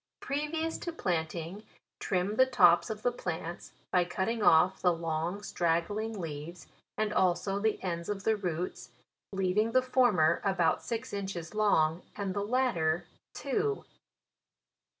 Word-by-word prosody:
" - - -61
Previous 310 +3 -2
to 340 - -4
planting, 170 - -3 0.4
trim 190 +3 -1
the 260 +3 +5
tops 175 -9 +5
of 215 -1 -5
the 245 - +2
plants, 175 -6 -5 0.2
by 180 - +4
cutting 190 +6 -2
offthe 180 -1 +4
long 165 +4 -2
stiaggling 205 +5 -1
leaves, 165 0 -6 0.3
and 215 0 0
also 190 +1 +1
the 220 +1 0
ends 170 -1 -3
of 200 -1 -3
the 220 - +3
roots, 175 -9 -4 0.4
leaving 195 +4 +1
the 255 - +5
for 255 -1 +4
mer 160 -5 +3
about 190 -5 +2
six 230 -3 -4
inches 190 -4 -4
long, 175 -6 +2
and 200 -2 -3
the 200 - -1
latter 205 -9 +1 0.3
two. 420 -1 -1
190 Hz, 140 wpm, -30 LUFS, 170-220 Hz, 0.4 s, the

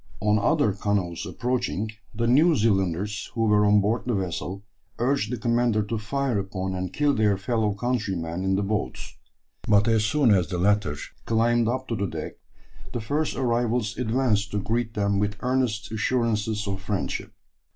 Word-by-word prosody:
On 105 +2 +2
other 145 -1 +2
canoes 100 -2 -1
approaching, 115 -1 -2 0.2
the 115 +2 -2
New 150 +8 +5
Zealanders 100 - 0
who 115 - -1
were 105 -1 +4
on 105 0 +5
board 105 +2 +1
the 120 - +1
vessel 95 +1 -3 0.3
urged 125 -2 0
the 125 - -2
commander 120 -1 +1
to 110 +2 -3
fire 130 +1 -1
upon 95 -1 -3
and 90 0 -3
kill 145 -1 +2
their 105 -5 +2
fellow 110 +1 0
countrymen 95 -7 -2
in 95 0 +1
the 100 - 0
boats; 105 +1 -3 0.5
but 105 0 +4
as 110 -2 +3
soon 120 0 +3
as 90 -3 +2
the 90 - -3
latter 100 -4 +2 0.3
climbed 115 +1 +2
up 130 +2 -2
to 115 - -2
the 100 -1 -1
deck, - - -5 0.6
the 120 - -2
first 145 +8 -1
arrivals 120 -2 0
advanced 110 -4 +1
to 105 - -2
greet 115 +2 -2
them 100 -1 +1
with 105 0 0
earnest 125 -4 0
assurances 110 -2 0
of 95 -1 -3
friendship. 100 0 -3
110 Hz, 170 wpm, -25 LUFS, 100-120 Hz, 0.6 s, New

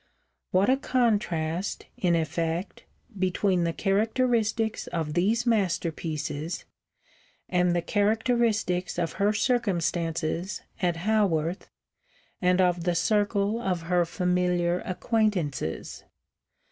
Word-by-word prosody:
_ - - -39 0.5
What 190 +2 +3
a 260 - +4
contrast, 200 -10 0
in 175 -2 +2
effect, 165 +3 -2 0.3
between 185 -1 +1
the 170 - +1
characteristics 220 +3 0
of 160 -3 -3
these 215 +8 +1
masterpieces 165 -7 -1 0.8
and 180 -1 +2
the 170 - 0
characteristics 215 -4 +1
of 170 -2 -1
her 205 +1 +4
circumstances 175 -6 -1 0.2
at 175 -2 +1
Haworth 180 -3 0 0.7
and 180 0 +3
of 180 -2 +2
the 175 0 +1
circle 205 +3 +1
of 180 -6 -1
her 175 +1 +2
familiar 180 0 +1
acquaintances! 185 - -1
180 Hz, 100 wpm, -27 LUFS, 170-215 Hz, 0.8 s, a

